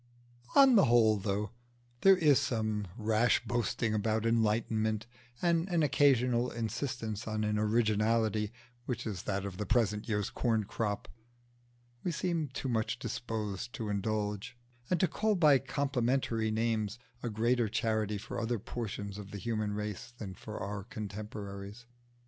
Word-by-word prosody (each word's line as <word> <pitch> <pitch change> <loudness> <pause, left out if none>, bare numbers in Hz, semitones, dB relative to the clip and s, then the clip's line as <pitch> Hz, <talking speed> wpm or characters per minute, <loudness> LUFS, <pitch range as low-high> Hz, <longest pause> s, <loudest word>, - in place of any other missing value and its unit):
On 270 -3 +8
the 200 - +7
whole, 115 -2 +5
though 100 +1 -2 0.5
there 195 -1 +7
is 150 -6 +5
some 110 -3 -1
rash 110 +1 +2
boasting 120 -1 0
about 110 +1 0
enlightenment, 110 -1 +1 0.4
and 170 +1 +2
an 170 -3 +2
occasional 125 -4 +3
insistance 115 -1 -3
on 110 0 -1
an 105 0 +1
originality 110 0 +2 0.4
which 120 -2 -3
is 100 -5 -3
that 100 -1 -2
of 95 -2 -5
the 105 - -2
present 105 -2 +1
year's 105 -2 0
corn 115 -3 +1
crop, 105 0 -3 1.0
we 180 - 0
seem 170 -2 -1
too 135 0 -5
much 110 -3 0
disposed 115 -1 -4
to 110 -2 -4
indulge, 105 +2 -2 0.3
and 180 - +2
to 185 - +4
call 215 +6 +1
by 150 -6 +6
complimentary 130 -4 0
names, 110 -1 0 0.2
a 120 - -2
greater 115 +1 +1
charity 110 -1 0
for 110 +4 -5
other 115 +1 0
portions 105 -2 -5
of 100 -1 -8
the 105 - -6
human 110 0 -2
race 105 +2 -4
than 100 -5 -6
for 110 +4 -8
our 100 0 -4
contemporaries. 105 0 -7
110 Hz, 145 wpm, -32 LUFS, 105-120 Hz, 1.0 s, On